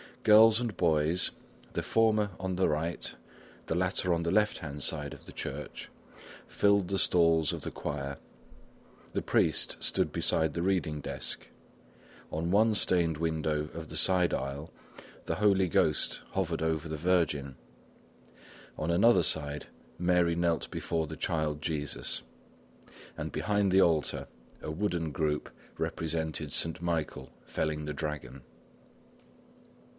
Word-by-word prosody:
Girls 110 +1 +7
and 120 -5 -3
boys, 80 +1 +3 0.4
the - - -1
former 110 -2 +2
on 95 -1 -2
the 95 - +2
right, 80 +2 -2 0.5
the 80 - -1
latter 90 0 +1
on 85 - 0
the 85 0 -1
left 105 0 +2
hand 70 -2 -6
side 75 -1 -2
of - - -13
the - - -11
church, - - -6 0.6
filled 100 -2 +3
the 95 +1 0
stalls 80 -4 +4
of - - -5
the - - -5
choir; 70 -1 -4 1.0
the - - 0
priest - - +2
stood - - +1
beside 80 -2 +2
the 85 - -2
reading 90 -5 0
desk; - - -5 0.8
on 85 +2 -2
one 110 +2 +4
stained 85 -5 +2
window 80 -2 -1
of 80 -1 -7
the - - -6
side 90 -2 +3
aisle 70 +4 -4 0.5
the - - -1
Holy 100 -3 +3
Ghost 75 -2 +1
hovered 85 -4 -1
over 80 0 0
the 80 0 -4
Virgin; 75 -5 +1 1.2
on 80 - -2
another 95 +1 +5
one, 75 -1 -5 0.4
Mary 90 -1 +2
knelt 85 -1 0
before 80 -2 -2
the 80 +1 -7
Child 75 -3 -1
Jesus, 75 -6 -2 1.0
and - - -4
behind 100 -2 +1
the 95 +1 +6
altar, 80 -4 +1 0.3
a - - -4
wooden 85 -2 -1
group 75 +1 -1 0.3
represented 80 -2 -2
Saint 80 0 -1
Michael 85 -3 -2
felling 75 -1 -2
the 75 - -3
dragon. 75 -4 -5
80 Hz, 135 wpm, -30 LUFS, 75-90 Hz, 1.2 s, Girls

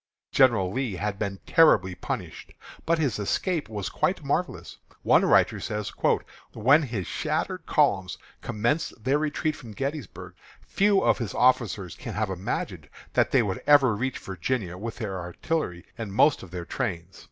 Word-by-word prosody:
General 105 -8 +4
Lee 130 -6 -2
had 105 +1 -3
been 100 -2 -3
terribly 105 - +5
punished, - - -6 0.3
but 165 +1 +3
his 140 -9 0
escape 155 - -1
was 105 -3 -4
quite - - -1
marvellous. - - -2 0.2
One - - +5
writer - - +4
says: 105 -1 -4 0.6
"When 135 +8 +5
his 115 - -3
shattered - - -2
columns 95 -2 +2 0.2
commenced 115 +2 -1
their 135 +3 +2
retreat 155 0 -1
from 115 -6 -11
Gettysburg, 140 +5 -5 0.3
few 200 0 +2
of - - +3
his 115 -7 -4
officers 110 -7 +2
can 115 -6 -7
have 105 -2 -1
imagined 95 +1 -4 0.2
that - - +3
they 130 -3 +4
would 95 -3 -3
ever 140 -6 +6
reach 130 +4 -2
Virginia 95 0 -3
with 110 +5 -6
their 100 -5 -4
artillery 90 - -3
and 110 -3 -4
most 145 +9 +4
of 95 - -11
their 85 0 -6
trains." 85 +2 -4
110 Hz, 155 wpm, -26 LUFS, 95-135 Hz, 0.6 s, ever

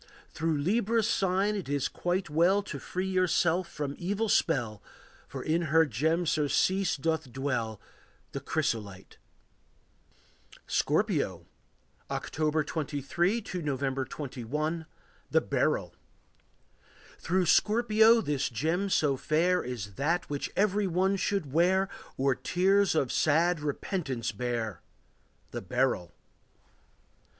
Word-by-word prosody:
Through 160 -1 -1
Libra's 215 +7 +1
sign 195 +2 +1
it 195 -8 -5
is 145 -2 0
quite 180 +1 -2
well 175 +6 +3
To - - -6
free 185 +1 -3
yourself 180 -1 +2
from 145 -2 -4
evil 205 +5 -1
spell, 120 - +1 0.5
For - - -6
in 160 +2 +1
her 160 +2 +5
gem 160 +7 0
surcease 165 +5 +1
doth 160 -2 -2
dwell, 120 -5 -2 0.5
The 140 - -4
chrysolite. 110 -10 -3 1.5
Scorpio. - - 0 0.6
October 155 0 -1
23 160 - -1
to 185 -3 -5
November 135 -2 -1
21. 150 +5 -4 0.4
The - - +4
Beryl. - - 0 1.3
Through 185 +2 +1
Scorpio 220 +4 +4
this 145 -8 -1
gem 160 - -1
so 150 -6 +2
fair 170 +6 +2
Is 110 -6 -5
that 170 +4 0
which 145 - -2
every 205 0 +2
one 190 +3 +1
should 190 -7 -1
wear, 190 +4 +3 0.3
Or 135 0 +2
tears 190 +6 +2
of 135 -5 +1
sad 165 +3 +2
repentance 145 - -3
bear,— 115 -3 -3 0.7
The - - -4
beryl. 125 -5 0
160 Hz, 110 wpm, -29 LUFS, 135-185 Hz, 1.5 s, her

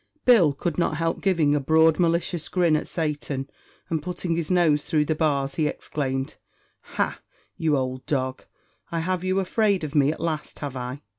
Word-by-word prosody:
Bill 220 - +6
could 170 +4 -3
not 160 -3 +1
help 165 +1 -1
giving 170 -7 +2
a 150 - +2
broad, 160 +3 +4
malicious 170 -1 0
grin 175 -4 +3
at 155 - -2
Satan, 145 -4 -3 0.4
and, 160 -2 -1
putting 175 0 -3
his 165 -2 -2
nose 170 -5 +3
through 150 -2 +1
the 155 - +1
bars, 140 -3 0
he 155 - +2
exclaimed 135 -3 -3 0.6
"Ha! - - 0 0.4
you 155 -3 +1
ould 130 0 -3
dog, 130 -2 -2 0.5
I 165 -1 -1
have 185 +1 -1
you 185 +1 +1
afraid 200 -1 +1
of 150 -2 -4
me 145 -1 +4
at - - -7
last, 155 -2 -3
have 140 -3 -5
I?" 125 +3 -5
155 Hz, 180 wpm, -25 LUFS, 145-170 Hz, 0.6 s, Bill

